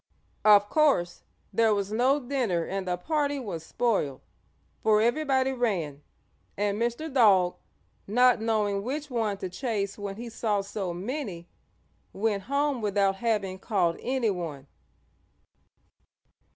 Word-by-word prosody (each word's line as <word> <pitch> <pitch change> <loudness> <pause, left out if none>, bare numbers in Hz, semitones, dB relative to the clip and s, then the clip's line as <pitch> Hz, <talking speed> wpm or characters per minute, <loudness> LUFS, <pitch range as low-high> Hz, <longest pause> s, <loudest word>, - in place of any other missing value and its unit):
Of 205 -1 +6
course 240 - +2 0.3
there 225 -2 +3
was 200 0 -2
no 255 +6 +3
dinner 240 - -1
and 195 -1 -4
the 180 0 0
party 290 - -1
was 195 - -5
spoiled, 180 - -1 0.6
for 215 -1 +4
everybody 265 +2 +2
ran, 185 - -1 0.6
and 205 +1 0
Mr. 240 +6 -2
Dog, 195 -8 +4 0.5
not 245 +2 +4
knowing 210 -3 0
which 285 +6 -4
one 220 -4 -1
to 190 - -4
chase 205 -1 -3
when 200 -1 -5
he 235 +3 -7
saw 220 -3 -1
so 195 -2 -4
many, 190 - -5 0.7
went 200 -1 -1
home 280 -2 +1
without 200 -2 +1
having 195 -4 -1
caught 185 -6 0
anyone. 180 - -2
210 Hz, 125 wpm, -27 LUFS, 195-250 Hz, 0.7 s, Of